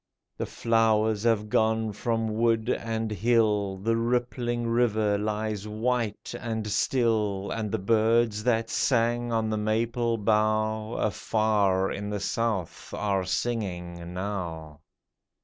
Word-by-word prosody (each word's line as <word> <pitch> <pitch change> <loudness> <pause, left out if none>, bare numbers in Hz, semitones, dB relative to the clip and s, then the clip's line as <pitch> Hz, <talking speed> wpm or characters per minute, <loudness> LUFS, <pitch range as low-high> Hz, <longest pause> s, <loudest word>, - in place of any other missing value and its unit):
The - - -4
flowers 110 -2 +2
have 110 -2 +2
gone 110 0 +1
from 115 +1 -1
wood 115 +1 +1
and 115 -1 -2
hill; 105 -2 +2
The 115 +4 0
rippling 120 0 -1
river 110 -3 +2
lies 105 0 -2
white 115 0 -2
and 110 -2 -3
still; 105 -3 0
And 110 -2 -3
the 110 - 0
birds 110 +1 +2
that 115 -2 +1
sang 120 -1 +1
on 110 -1 0
the 110 - 0
maple 115 +2 0
bough, 110 +1 +1
Afar 105 -3 +1
in 105 +1 -4
the 105 -1 -2
South 110 -6 -2
are 100 -3 0
singing 90 -5 -3
now 85 -6 -5
110 Hz, 120 wpm, -27 LUFS, 105-115 Hz, -, flowers